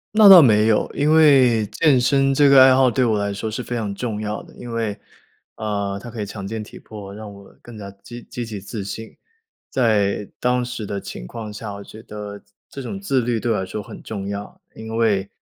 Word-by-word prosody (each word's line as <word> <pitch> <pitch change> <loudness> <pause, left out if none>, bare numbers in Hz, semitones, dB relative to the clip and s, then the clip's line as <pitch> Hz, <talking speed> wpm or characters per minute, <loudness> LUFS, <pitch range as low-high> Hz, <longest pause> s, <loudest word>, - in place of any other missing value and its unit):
那 215 -2 +8
倒 180 -5 +11
没 110 -2 +4
有， 110 - +2
因 145 +2 +1
为 130 -8 +5
健 145 -6 +3
身 135 +2 +2
这 145 0 +5
个 135 -1 +8
爱 130 - +7
好， 130 -1 +4
对 125 +3 +1
我 110 -3 +2
来 100 0 -2
说 110 +2 -4
是 115 +3 -4
非 120 - -5
常 105 -4 -3
重 110 -1 -4
要 105 0 -4
的。 - - -17
因 120 - -9
为， 115 -3 -2 0.6
呃， 100 -2 -3
它 120 - -8
可 115 - -6
以 - - -2
强 100 -1 -8
健 110 +1 -5
体 - - -12
魄， 100 -2 -10
让 105 -1 -9
我 100 -1 -15
更 120 - -12
加 100 -2 -8
积 120 0 -9
积 120 -1 -5
极 105 -3 -7
自 100 0 -6
信。 110 +3 -8 0.5
在 105 -5 +1
当 125 0 +1
时 120 -3 -5
的 100 -1 -4
情 - - -8
况 110 - -7
下， 105 -1 -7
我 100 0 -8
觉 110 +2 -13
得 105 -2 -8 0.3
这 140 - -9
种 195 +10 -6
自 135 -10 +1
律 120 -1 -1
对 120 - -1
我 110 - +1
来 95 - -3
说 105 +3 -5
很 - - -11
重 100 -3 -6
要， 100 0 -7
因 110 0 -7
为 100 -4 +1
110 Hz, 250 characters per minute, -21 LUFS, 105-125 Hz, 0.6 s, 倒